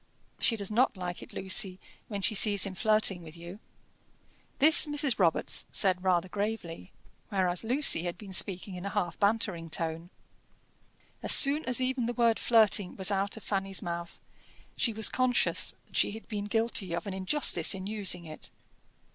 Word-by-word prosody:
"She 230 - 0
does 200 -2 -4
not 230 -1 +1
like 180 -1 -7
it, - - -13
Lucy, 190 0 0 0.3
when 200 -3 -6
she 220 - 0
sees 205 -1 +3
him 195 - -6
flirting 215 -2 +1
with 160 0 -13
you." 170 +4 -11 1.0
This 310 +2 +5
Mrs. 290 -5 0
Robarts 170 -4 0
said 185 -2 -1
rather 185 -1 0
gravely, 200 - -6 0.4
whereas 185 -2 -1
Lucy 250 - +4
had 175 0 -5
been 195 -1 -11
speaking 190 +1 +3
in 180 0 -8
a 200 - -4
half 180 -5 -4
bantering 200 -5 -1
tone. 165 +1 -4 1.1
As - - +4
soon 290 +3 +8
as 255 -1 +2
even 255 -2 -2
the 240 - -3
word 235 -2 +1
flirting 215 -5 +2
was 190 +1 -1
out 195 +2 -2
of 220 - -12
Fanny's 195 -2 -3
mouth, 170 0 -7 0.6
she 235 - -1
was 220 0 0
conscious 255 -1 0
that - - -20
she - - 0
had 220 - -12
been 205 -2 -5
guilty 225 -4 -2
of 170 - -6
an 200 - -6
injustice 190 +4 +2
in 190 0 -8
using 200 -4 -1
it. 155 -1 -9
200 Hz, 170 wpm, -28 LUFS, 180-225 Hz, 1.1 s, soon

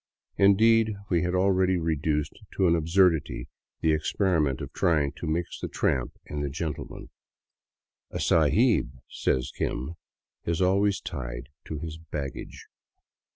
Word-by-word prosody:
Indeed, 110 +2 +5 0.2
we 85 -2 +3
had 90 0 0
already 95 0 +3
reduced 75 -2 0 0.2
to 95 - +3
an 85 - +4
absurdity 80 -6 +2 0.3
the 80 - +3
ex 75 0 -1
periment 80 -9 +1
of - - -7
trying 80 -6 +2
to 85 - -5
mix 85 +2 -2
the - - -3
tramp 65 -3 0
and 75 0 -4
the 70 - -1
gentleman. 80 +2 -5 0.5
" - - -67
A - - -5
sahib," 85 - +3
said 65 - 0
Kim, 65 +7 -2 0.3
" - - -63
is 85 - -1
always 100 +2 +2
tied - - -6 0.2
to 80 - -5
his 80 +1 -6
baggage." 75 -4 -6
80 Hz, 145 wpm, -27 LUFS, 75-95 Hz, 0.5 s, Indeed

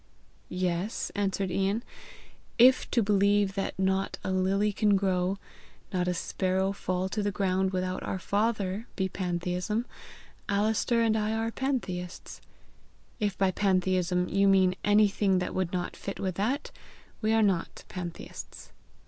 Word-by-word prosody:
"Yes," 180 +3 -2
answered 195 -2 -1
Ian. 195 +5 0 0.7
"If 255 +2 +6
to 235 - +2
believe 200 0 +3
that 195 0 -3
not 190 0 0
a - - -2
lily 195 +3 +1
can 205 0 +3
grow, 190 -1 +1 0.6
not 180 -1 0
a 180 - 0
sparrow 190 +2 0
fall 185 -1 -2
to 210 - -2
the 205 - 0
ground 190 -1 +1
without 185 0 -2
our - - -3
Father, 205 +1 -1
be 190 -2 0
pantheism, 180 +4 -2 0.6
Alister 215 +3 +2
and 220 -1 +3
I 215 0 0
are 225 +1 -1
pantheists. 190 -10 -4 0.8
If 205 -3 -1
by 195 -1 +3
pantheism 185 -2 +1
you 200 0 +2
mean 190 -2 +5
anything 205 -2 +3
that 180 - -2
would 185 -2 -1
not 180 -1 -3
fit 195 - -6
with 185 -1 -1
that, 235 - -1 0.5
we 215 0 +1
are 225 0 +4
not 190 -5 0
pantheists." 175 -2 -8
195 Hz, 140 wpm, -28 LUFS, 185-210 Hz, 0.8 s, If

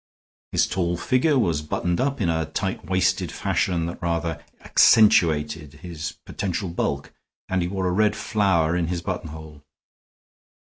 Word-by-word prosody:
His - - +3
tall 85 -2 -1
figure 130 - +2
was 85 - +1
buttoned 85 +4 -1
up 140 +1 -1
in 95 - +1
a 80 -2 0
tight 95 +4 -3
waisted 95 -1 +1
fashion 85 -3 0
that 85 - -6
rather 85 -1 -2 0.2
accentuated 75 -8 +4
his 80 -1 -6
potential 95 -1 -3
bulk, 70 -4 -3 0.3
and 95 -1 0
he 85 - -1
wore 95 0 -2
a - - +1
red 105 +3 +2
flower 90 -6 +1
in 85 -2 0
his 85 0 -3
buttonhole. 80 -5 -6
85 Hz, 145 wpm, -24 LUFS, 80-95 Hz, 0.3 s, accentuated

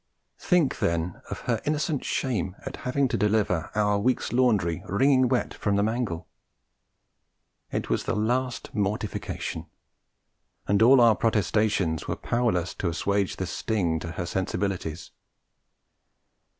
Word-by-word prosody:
Think, 175 -6 +2
then, 85 +1 -1
of - - -5
her - - -1
innocent 150 -1 -1
shame 100 -8 -1
at - - -5
having 135 +2 +2
to - - 0
deliver 100 -5 +1
our 105 -1 +2
week's 125 +4 0
laundry 105 -10 +2
wringing 130 +5 +4
wet 125 -1 0
from 100 -1 -1
the 100 - +2
mangle! 110 -7 -2 1.4
It - - -2
was - - 0
the - - -1
last 120 +4 -1
mortification; 105 0 -3 1.0
and 100 +1 +2
all 125 +3 +7
our 115 -2 +6
protestations 105 -6 +1
were - - -1
powerless 110 -8 0
to 90 - 0
assuage 100 +3 0
the 95 - -3
sting 90 -3 -1
to 85 +1 -6
her 90 - -3
sensibilities. 90 -2 -3
105 Hz, 130 wpm, -26 LUFS, 90-120 Hz, 1.4 s, all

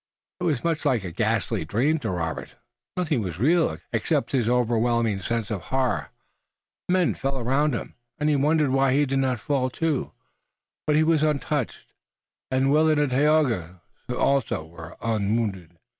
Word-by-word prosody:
It 180 - -2
was 150 -8 0
much 165 -2 0
like 120 -6 +1
a 90 - -5
ghastly - - 0
dream 130 - +1
to 115 -6 -3
Robert. 80 -3 -4 0.4
Nothing 155 -8 0
was 90 -5 -4
real, 150 - +2 0.2
except - - 0
his 120 -4 +1
overwhelming 115 -3 +1
sense 115 +1 -2
of 100 -4 -2
horror. 130 -1 0 0.8
Men 180 -2 +3
fell 135 0 -3
around 135 +3 +1
him, - - -6 0.2
and 150 - 0
he 150 - +3
wondered 150 0 +2
why 135 0 +3
he 145 +2 +3
did 135 0 0
not 130 -3 0
fall 130 -1 0
too, 155 +1 -1 0.8
but 150 - +3
he 155 - +4
was 160 -1 +3
untouched, 150 -3 -1 0.6
and 130 +1 +2
Willet 155 +1 +4
and 145 -2 +1
Tayoga 125 - +2 0.3
also 125 - 0
were 80 0 -11
unwounded. 100 -5 -1
130 Hz, 160 wpm, -25 LUFS, 110-150 Hz, 0.8 s, he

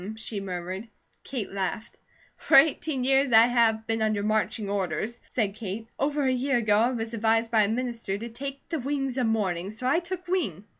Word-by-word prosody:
she 220 -1 -3
murmured. 185 +2 -5 0.4
Kate 245 -8 -5
laughed. 195 +2 -3 0.4
"For - - +4
eighteen 280 -1 +3
years 270 0 +3
I 225 0 +8
have 230 -2 +2
been 225 0 -1
under 215 -2 +1
marching 215 0 0
orders," 200 +4 -2
said 210 -5 -1
Kate. 215 +1 -6
"Over 285 0 0
a 260 - +2
year 260 +1 +1
ago 210 -3 +3
I 235 +3 +3
was 225 -2 -4
advised 225 +1 +1
by 220 -2 +4
a - - -1
minister 230 -3 -2
to 230 +3 -6
'take 275 +4 -7
the 325 - -2
wings 270 -1 -2
of 245 - +1
morning' 195 -5 -1
so 220 +4 -6
I 275 +6 +3
took 360 +1 -6
wing. 290 - -1
225 Hz, 195 wpm, -27 LUFS, 210-260 Hz, 0.4 s, I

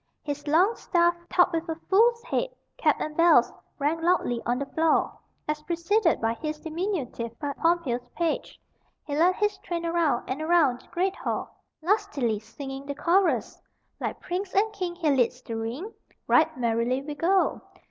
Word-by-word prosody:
His 290 0 -5
long 360 +10 +4
staff, 345 -1 +2 0.2
topped 355 -1 +4
with 330 +1 -2
a 325 - -1
fool's 465 +4 +4
head, - - -1 0.3
cap, - - +3
and 305 0 -4
bells, 340 +1 +5 0.2
rang 305 +3 0
loudly 330 -9 +1
on 240 +1 +1
the 280 - -2
floor, 320 +3 +1 0.3
as, 300 0 -2
preceded 340 +4 +1
by 225 0 +1
his 305 +4 -5
diminutive 310 - -3
but 285 -2 -4
pompous 285 -8 0
page, 335 -2 -2 0.5
he 285 - -3
led 350 +4 +4
his 415 -1 0
train 340 -1 -4
around 335 -7 +1
and 265 +4 -3
around 315 -7 +3
the - - -23
great 375 +2 -1
hall, - - -4 0.3
lustily 320 - +1
singing 270 +5 -8
the 285 - -3
chorus: 350 +6 +1 0.4
"Like - - -3
prince 370 +2 -4
and 430 +3 +2
king 360 -3 -3
he 330 -4 +1
leads 250 -2 +2
the 230 - -5
ring; 240 - -4 0.3
Right 315 -1 +3
merrily 240 +2 0
we 295 +1 -5
go. 360 +6 +1
320 Hz, 170 wpm, -26 LUFS, 270-360 Hz, 0.5 s, bells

